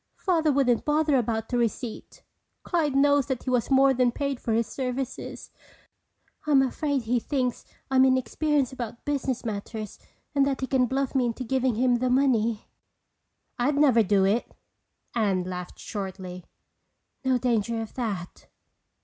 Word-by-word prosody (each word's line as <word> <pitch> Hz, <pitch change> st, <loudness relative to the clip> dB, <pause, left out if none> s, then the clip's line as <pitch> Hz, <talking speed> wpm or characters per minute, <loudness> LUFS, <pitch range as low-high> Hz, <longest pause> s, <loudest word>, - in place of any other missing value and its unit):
Father 325 Hz, -5 st, +2 dB
wouldn't 265 Hz, -4 st, +2 dB
bother 300 Hz, -1 st, +2 dB
about 225 Hz, -1 st, -1 dB
a -, -, +3 dB
receipt. 235 Hz, 0 st, -3 dB, 0.4 s
Clyde 310 Hz, -6 st, 0 dB
knows 285 Hz, 0 st, +4 dB
that 265 Hz, -3 st, -3 dB
he 255 Hz, -, -2 dB
was 245 Hz, -2 st, +1 dB
more 270 Hz, 0 st, +5 dB
than 250 Hz, -1 st, +2 dB
paid 280 Hz, 0 st, -2 dB
for 230 Hz, -, -3 dB
his 230 Hz, +1 st, +2 dB
services. 260 Hz, +1 st, -5 dB, 1.0 s
I'm 275 Hz, -3 st, +5 dB
afraid 280 Hz, 0 st, -1 dB
he 240 Hz, +2 st, +1 dB
thinks 250 Hz, -1 st, -2 dB, 0.3 s
I'm 260 Hz, 0 st, +5 dB
inexperienced 265 Hz, +2 st, +1 dB
about 235 Hz, -2 st, -7 dB
business 270 Hz, -4 st, -2 dB
matters 215 Hz, 0 st, -5 dB, 0.3 s
and 280 Hz, -1 st, +3 dB
that 270 Hz, -1 st, -2 dB
he -, -, 0 dB
can 255 Hz, -1 st, +2 dB
bluff 270 Hz, +1 st, -1 dB
me 255 Hz, -3 st, +2 dB
into 235 Hz, +2 st, -3 dB
giving 255 Hz, -1 st, 0 dB
him 245 Hz, +1 st, +3 dB
the 255 Hz, +1 st, 0 dB
money." 235 Hz, -4 st, +2 dB, 0.9 s
"I'd 275 Hz, +4 st, +2 dB
never 270 Hz, -6 st, +5 dB
do 195 Hz, -2 st, +3 dB
it." 210 Hz, +5 st, 0 dB, 0.6 s
Anne 200 Hz, -6 st, +1 dB
laughed 180 Hz, -1 st, -6 dB
shortly. 190 Hz, -3 st, -6 dB, 0.8 s
"No 260 Hz, -1 st, +2 dB
danger 235 Hz, -2 st, 0 dB
of 225 Hz, -1 st, -6 dB
that. 200 Hz, -8 st, -5 dB
250 Hz, 150 wpm, -26 LUFS, 225-270 Hz, 1.0 s, more